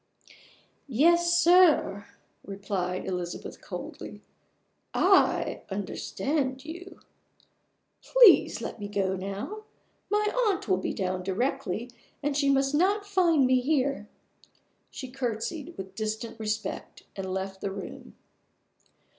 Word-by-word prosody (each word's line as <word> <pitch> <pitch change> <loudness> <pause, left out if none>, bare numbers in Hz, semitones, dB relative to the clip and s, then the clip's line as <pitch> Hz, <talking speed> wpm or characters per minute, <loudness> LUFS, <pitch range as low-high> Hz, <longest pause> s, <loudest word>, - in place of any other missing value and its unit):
"Yes, 340 +6 +4
sir," 335 - +4 0.4
replied 195 -2 -3
Isabel 180 -2 -4
coldly; - - -8 0.7
"I - - +3
understand 260 +7 -2
you. 355 +4 -9 1.0
Please - - +6
let - - -6
me 205 - -5
go 195 -2 -1
now. 200 - -6 0.4
My 420 +1 +2 0.2
aunt 385 -9 -1
will 185 -2 +3
be - - -2
down 185 -1 -2
directly; 235 +3 -2 0.3
and 290 0 0
she 280 -1 +2
must 270 0 +2
not 395 +6 +2
find 345 -8 +3
me 255 0 +4
here." 275 -5 0 0.8
She 260 -2 -8
curtseyed 270 +6 -4
with 190 0 -7
distant 220 +1 -4
respect, 215 0 -4
and 190 -1 -4
left 190 0 -4
the - - -2
room. 195 0 -8
250 Hz, 110 wpm, -28 LUFS, 195-320 Hz, 1.0 s, Please